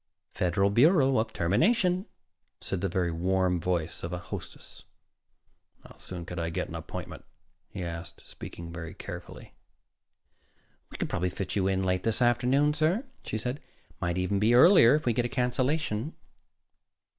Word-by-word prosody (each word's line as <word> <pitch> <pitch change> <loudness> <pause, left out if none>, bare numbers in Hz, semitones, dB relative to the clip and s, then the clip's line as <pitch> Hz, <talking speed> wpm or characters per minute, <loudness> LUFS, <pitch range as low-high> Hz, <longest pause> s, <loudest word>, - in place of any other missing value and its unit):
"Federal 95 +3 +1
Bureau 135 - +4
of 110 - -1
Termination," 180 - +2 0.5
said 95 - -3
the 100 - 0
very 90 -1 0
warm 90 +1 +1
voice 85 -2 -2
of 85 - -5
a 90 - -2
hostess. 90 - -9 1.0
"How - - -14
soon 90 -2 -7
could 90 0 -6
I 85 0 -1
get 80 - -3
an - - -9
appointment?" - - -7 0.5
he 95 - -6
asked, 85 0 -7
speaking 85 0 -9
very 80 -1 -7
carefully. - - -9 1.4
"We - - -9
could - - -2
probably 90 +1 -1
fit 90 -1 -4
you 95 -2 +1
in 95 0 +1
late 90 -1 +1
this 115 +2 0
afternoon, 125 +4 +3
sir," 160 - +1 0.2
she - - -3
said. 125 +4 -3 0.3
"It - - -30
might 85 +1 -1
even 95 +2 0
be 110 +4 +4
earlier, 145 - +8
if 155 - -2
we 120 - +2
get 120 - +1
a - - -2
cancellation." 125 +1 -1
100 Hz, 160 wpm, -28 LUFS, 90-130 Hz, 1.4 s, earlier